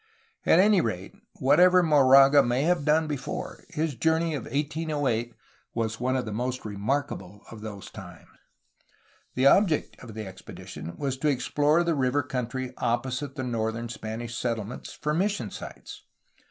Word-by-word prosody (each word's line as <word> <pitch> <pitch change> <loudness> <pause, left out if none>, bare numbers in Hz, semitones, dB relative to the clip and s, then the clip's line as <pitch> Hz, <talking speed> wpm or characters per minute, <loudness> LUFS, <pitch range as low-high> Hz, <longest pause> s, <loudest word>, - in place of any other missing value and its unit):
At - - +6
any 200 0 +5
rate, 95 -4 -4 0.2
whatever 180 +7 +5
Moraga 140 -2 +7
may 125 +1 0
have 170 -2 +1
done 155 +1 +3
before, 145 -3 -5
his 155 -1 -2
jour 160 +6 +2
ney 165 -1 -1
of 140 -6 -4
1808 145 -5 -1 0.4
was 110 -1 -2
one 130 +2 0
of 130 - -1
the 110 - -5
most 125 +3 -3
remarkable 105 -2 -3
of 110 -2 -10
those 105 -3 -8
times. - - -11 1.1
The 130 - +2
object 165 +2 +3
of 115 -4 -11
the 110 -1 -5
expedition 95 -3 -9
was 135 -2 -2
to 150 - -1
explore 145 +4 +2
the 170 -1 +1
river 140 0 +1
country 130 0 -4
opposite 130 +3 -1
the 130 - -3
northern 115 -1 -2
Spanish 115 +1 -6
settlements 115 -2 -4
for 150 - -3
mis 195 +6 +1
sion 115 - -5
sites. - - -9
130 Hz, 155 wpm, -27 LUFS, 115-150 Hz, 1.1 s, Moraga